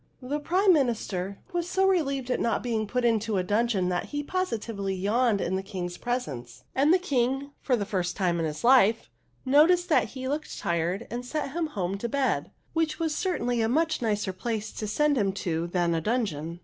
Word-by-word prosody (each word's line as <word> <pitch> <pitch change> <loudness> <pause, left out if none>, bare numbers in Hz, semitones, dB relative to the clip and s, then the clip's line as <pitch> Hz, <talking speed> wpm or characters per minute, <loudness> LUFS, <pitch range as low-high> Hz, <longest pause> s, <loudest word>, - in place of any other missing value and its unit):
" - - -40
The 285 +4 -2
Prime 370 +6 +3
Minister 210 - -1 0.2
was 350 0 -1
so 385 +1 +2
relieved 275 -9 +1
at - - +1
not 230 - 0
being 225 -3 -1
put 250 +3 0
into 225 -2 +1
a 185 - +1
dungeon 205 -2 +1
that 180 -1 -1
he 290 0 -4
positively 230 - -2
yawned 210 +3 +2
in 185 0 -1
the - - -2
King's 180 -3 -5
presence; 130 - -4
and 285 +4 +3
the 365 - +6
King, 270 -4 0
for 255 - +2
the 205 -4 -2
first 180 -3 -2
time 175 -4 +1
in 165 - 0
his 155 0 -4
life, 235 -3 +4 0.3
noticed 325 +7 +5
that 315 - +4
he 260 0 -4
looked 295 +3 -3
tired 170 +5 -1
and 240 +1 -3
sent 280 +2 -3
him 330 +2 -1
home 195 -7 -3
to 235 - -3
bed, 275 +1 0 0.2
which 325 -2 0
was 325 -2 -1
certainly 245 -10 0
a 225 - +1
much 315 +4 +1
nicer 210 -4 0
place 220 +2 -3
to 215 - -5
send 290 +5 +2
him 195 -2 +2
to 170 -3 -2
than 175 -1 +1
a 165 - 0
dungeon. 170 -7 -2
235 Hz, 205 wpm, -27 LUFS, 190-285 Hz, 0.3 s, the